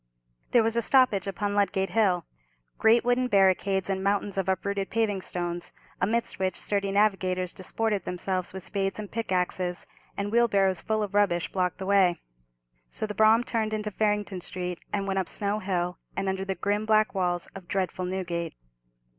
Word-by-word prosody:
There 240 - +4
was 225 +1 0
a 235 - +2
stoppage 230 -6 +3
upon 205 +1 -2
Ludgate 195 -1 +1
Hill. 190 -6 +2 0.5
Great 230 +2 +5
wooden 245 +1 +2
barricades 195 -2 +3
and 190 -1 -1
mountains 200 0 0
of 190 -1 -1
uprooted 195 +1 -1
paving 210 -4 0
stones, 175 -1 -3 0.3
amidst 225 +4 0
which 185 -2 -1
sturdy 200 -1 -1
navigators 185 -3 +1
disported 210 +2 -1
themselves 180 0 -2
with 190 -1 -8
spades 195 -1 -1
and 210 -2 -6
pickaxes, 180 -4 -1 0.3
and 200 +1 -2
wheelbarrows 200 -6 +3
full 215 -1 0
of 205 - -5
rubbish, 190 -5 +2
blocked 180 -2 0
the 190 - -5
way; 190 -3 +4 0.7
so - - -3
the 210 - -5
brougham 220 +3 +5
turned 220 -3 -1
into 210 0 -3
Farringdon 210 -2 -1
Street, 180 -1 -4
and 200 -1 -1
went 195 -1 0
up 185 - -1
Snow 205 +1 -1
Hill, 180 -3 -2 0.2
and 195 0 -1
under 190 0 -1
the 190 0 -2
grim 205 +2 -1
black 215 0 +3
walls 180 -3 0
of 190 -2 -10
dreadful 185 -1 -2
Newgate. 175 -3 -3
195 Hz, 170 wpm, -27 LUFS, 185-210 Hz, 0.7 s, Great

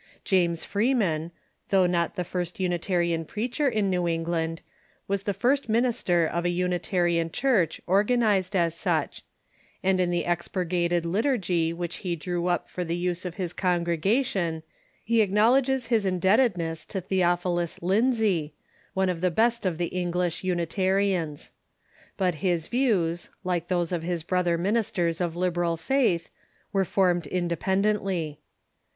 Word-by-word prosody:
James 170 -3 +1
Freeman, 200 -8 +1 0.4
though 190 -2 +4
not 175 0 0
the 180 - -1
first 175 +1 -4
Unitarian 175 -2 0
preacher 245 - -1
in 215 -5 0
New 180 -1 0
England, 165 0 -1 0.5
was 200 -1 -1
the 200 - -1
first 255 +6 +1
minister 225 -7 +2
of 170 +2 -2
a 175 - +1
Unitarian 175 -1 0
Church 220 - +1
organized 205 -1 +2
as 170 -3 +2
such; 170 - -1 0.6
and 190 0 +2
in 180 -1 +2
the 175 -1 0
expurgated 175 0 0
liturgy 180 - +1
which 170 0 -4
he 175 -2 -3
drew 175 +2 -3
up 175 -1 0
for 180 - -4
the 170 0 -2
use 175 0 -2
of 180 -1 -5
his 180 -3 -3
con 175 -2 0
gregation 175 - 0 0.4
he 230 0 +3
acknowledges 245 +6 +3
his 225 -2 +1
indebtedness 185 -3 +1
to 195 - -4
Theophilus 175 -2 0
Lindsey, 195 - +1 0.4
one 190 0 +2
of 175 -2 -2
the 180 - +3
best 225 +3 +1
of 170 -3 -2
the 175 0 -1
English 180 -1 -2
Unitarians. 185 -2 0 0.7
But 185 -2 +1
his 175 -4 0
views, 195 -10 +1
like 175 -2 -1
those 175 -2 0
of 175 -2 -1
his 170 -1 -3
brother 175 -1 +1
ministers 180 -3 0
of 170 -2 -1
the 175 - -7
liberal 175 -2 0
faith, 225 -6 +1 0.4
were 195 -1 +2
formed 175 -4 +1
independently. 185 -1 -1
180 Hz, 145 wpm, -26 LUFS, 170-200 Hz, 0.7 s, though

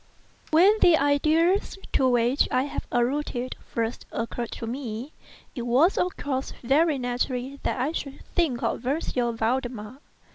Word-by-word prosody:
When 380 +7 +5
the 340 -3 +6
ideas 315 +8 +2 0.2
to 260 -1 +3
which 245 +2 +2
I 255 +1 +2
have 285 - -5
alluded 250 0 -1
first 230 +1 -3
occurred 230 0 -3
to - - -6
me, 245 +2 -5 0.4
it 245 - -5
was 255 +10 +3
of 360 - -1
course 270 -2 -3
very 295 +4 +3
natural 250 +2 -2
that - - -2
I 265 +5 0
should 280 -4 -6
think 295 -9 +1
of - - -1
M. 275 +5 0 0.4
Valdemar. 240 0 -2
260 Hz, 145 wpm, -26 LUFS, 245-295 Hz, 0.4 s, the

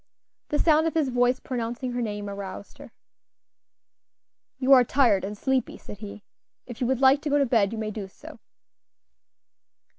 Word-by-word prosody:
The 295 - -1
sound 315 +1 +3
of 325 - -3
his 305 -5 +1
voice 245 +1 +1
pronouncing 245 0 -4
her 245 0 -3
name 205 -2 -4
aroused 200 0 -8
her. - - -12 1.7
"You 265 +1 +4
are 255 -2 +7
tired 235 -7 +2
and 205 +2 -5
sleepy," 265 +3 -1
said 205 - -11
he; 210 -1 -9 0.4
"if 240 -1 -10
you 245 - +1
would 260 0 -1
like 270 +2 +5
to 300 - -3
go 290 - +2
to 280 - +3
bed 225 -5 +2
you 230 - -5
may 215 -1 -3
do 205 -2 -6
so." 190 - -14
245 Hz, 175 wpm, -25 LUFS, 210-265 Hz, 1.7 s, are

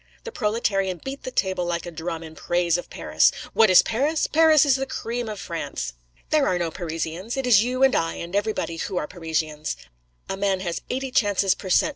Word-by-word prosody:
The 470 - -6
proletarian 195 - 0
beat 270 +1 -5
the - - -5
table 190 -7 0
like 170 -1 -2
a 175 - -6
drum 165 0 -5
in 160 -1 -10
praise 175 +1 0
of 175 - -4
Paris. - - +2 0.2
'What 220 -2 +5
is 185 - +8
Paris? 290 +7 0
Paris 315 -2 +5
is 275 -3 +4
the 270 0 -3
cream 235 -2 -4
of 210 -2 -6
France. 165 - -4 0.4
There 300 -3 +3
are 180 - +1
no 170 -2 -1
Parisians: 170 - -4
it 270 - -1
is 220 -4 +6
you 255 +2 0
and 265 -1 +5
I 165 0 0
and 170 +3 -6
everybody 205 -5 -1
who 185 +2 -3
are 150 - 0
Parisians. 155 - -3 0.5
A 195 - -3
man 195 -1 0
has 170 -3 -3
eighty 265 +1 -3
chances 200 -5 +3
per 190 - -8
cent. 300 - +4
195 Hz, 210 wpm, -24 LUFS, 170-245 Hz, 0.5 s, is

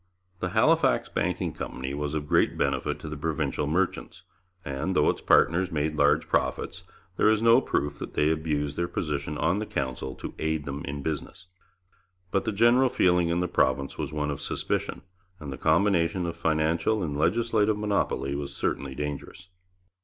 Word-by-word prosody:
The 95 - -2
Halifax 155 - +3
Banking - - -1
Company 65 +1 -5
was 75 +1 -3
of 75 -1 -3
great - - +2
benefit - - 0
to - - -7
the 75 - -5
provincial 75 -2 -2
merchants, 90 +4 -1 0.4
and, 70 +7 -2
though - - +4
its - - -8
partners 90 +3 +3
made 75 0 -1
large 75 -1 +3
profits, 85 +2 -1 0.3
there - - +4
is 110 -1 +3
no 115 0 +6
proof 75 - -2
that - - -7
they 75 +1 +3
abused 75 -2 -1
their 85 0 0
position 75 -3 -3
on 85 +7 +1
the 110 - -3
Council 65 -1 -3
to - - -7
aid 80 -1 -1
them 70 0 -5
in 70 0 -5
business. 80 +4 -4 0.9
But 100 - 0
the 110 - 0
general 120 +5 +4
feeling 90 -7 +3
in 85 +1 +1
the 90 - 0
province 70 -3 0
was - - -3
one 75 -1 -2
of 70 - -5
suspicion, - - -2 0.4
and 70 -3 -6
the - - -7
combination 85 +1 +2
of 85 0 -3
financial 80 +5 +1
and 75 -4 -3
legislative 110 +6 +2
monopoly 100 -9 -1
was 70 0 -4
certainly 70 -1 -2
dangerous. 75 +5 -6
80 Hz, 175 wpm, -27 LUFS, 75-95 Hz, 0.9 s, no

